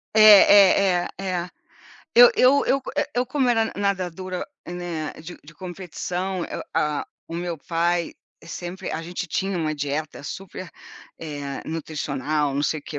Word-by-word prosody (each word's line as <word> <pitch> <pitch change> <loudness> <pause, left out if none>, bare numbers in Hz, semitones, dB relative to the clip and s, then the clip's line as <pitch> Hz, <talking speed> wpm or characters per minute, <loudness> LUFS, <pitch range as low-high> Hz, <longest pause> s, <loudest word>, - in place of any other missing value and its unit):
É 215 - +6
é 200 -3 +7
é - - -5
é. 180 -2 -2 0.6
Eu 485 +1 +9
eu 275 -1 +4
eu, 275 - +2 0.2
eh, - - +2
eu 245 +1 +1
como 265 0 0
era 225 -2 +3
nada 210 - -7
nadadora, 185 -2 -2 0.2
né, 175 -3 -5
de 175 +2 -9
de 150 +3 -14
competição. 180 +1 -4
Eu - - -6
a 150 -1 0 0.2
o - - -8
meu 170 0 -3
pai 170 +2 -1 0.3
sempre 175 +2 -6
a 160 - -3
gente 175 +2 -5
tinha 195 +2 -2
uma 155 -2 -1
dieta 145 +1 -4
super, 185 +3 -7 0.5
eh, 145 -3 -6
nutricional, 150 -2 -2
não 140 - 0
sei 155 +1 0
o - - -38
que. 150 - -6
175 Hz, 160 wpm, -23 LUFS, 155-195 Hz, 0.6 s, Eu